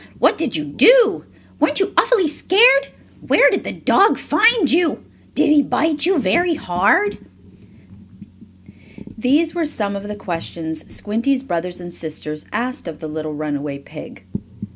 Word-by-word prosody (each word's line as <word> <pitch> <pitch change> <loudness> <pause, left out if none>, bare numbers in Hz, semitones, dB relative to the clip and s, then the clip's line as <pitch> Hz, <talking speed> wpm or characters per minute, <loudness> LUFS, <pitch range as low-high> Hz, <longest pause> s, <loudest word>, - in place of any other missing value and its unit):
"What - - +3
did 300 - -1
you 155 - -2
do?" 420 - +4 0.3
"Weren't 300 +2 +2
you 390 0 -1
awfully 460 -9 +3
scared?" 325 - +4 0.4
"Where - - +5
did - - -1
the - - -4
dog 405 +2 +2
find 445 - +2
you?" 335 +1 +1 0.3
"Did - - +3
he 300 -1 +5
bite 305 +2 0
you 380 -1 +2
very 325 - +1
hard?" 305 - +1 2.0
These 290 +8 +1
were 335 -3 -1
some 205 -8 -3
of 200 +1 -7
the 210 - -6
questions 165 -4 -6
Squinty's 240 +6 -2
brothers 175 -5 -4
and 175 -1 -9
sisters 155 -2 -6
asked 250 -4 -4
of 160 -2 -7
the 160 - -8
little 155 0 -6
runaway 145 -1 -4
pig. 140 - -12
255 Hz, 145 wpm, -19 LUFS, -, 2.0 s, Where